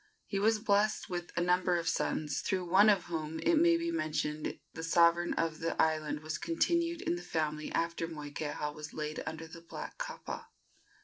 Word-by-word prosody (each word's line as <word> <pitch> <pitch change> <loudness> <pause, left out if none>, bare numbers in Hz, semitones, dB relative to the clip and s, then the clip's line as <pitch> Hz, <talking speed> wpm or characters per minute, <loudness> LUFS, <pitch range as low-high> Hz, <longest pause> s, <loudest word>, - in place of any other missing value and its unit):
He 195 - -2
was 220 +2 +4
blessed 210 -2 +1
with 175 -1 -3
a - - +3
number 180 0 +3
of 170 -1 -3
sons, 155 -2 0
through 185 -2 -1
one 195 +5 +6
of 195 -4 +4
whom, 160 -2 -4
it 340 -2 +3
may 335 +1 +5
be 335 0 -1
mentioned, 155 - -2 0.2
the 160 - -6
sovereignty 170 +1 +4
of 165 -1 0
the 165 0 -2
island 155 -1 +1
was 155 0 -4
continued 335 0 +1
in 175 - 0
the - - -7
family 155 -3 -2
after 165 0 -1
Moikeha 150 -1 -4
was 150 0 -8
laid 155 0 -3
under 160 0 -5
the 165 +1 -11
black 170 - -8
kapa. - - -5
170 Hz, 185 wpm, -32 LUFS, 155-200 Hz, 0.2 s, one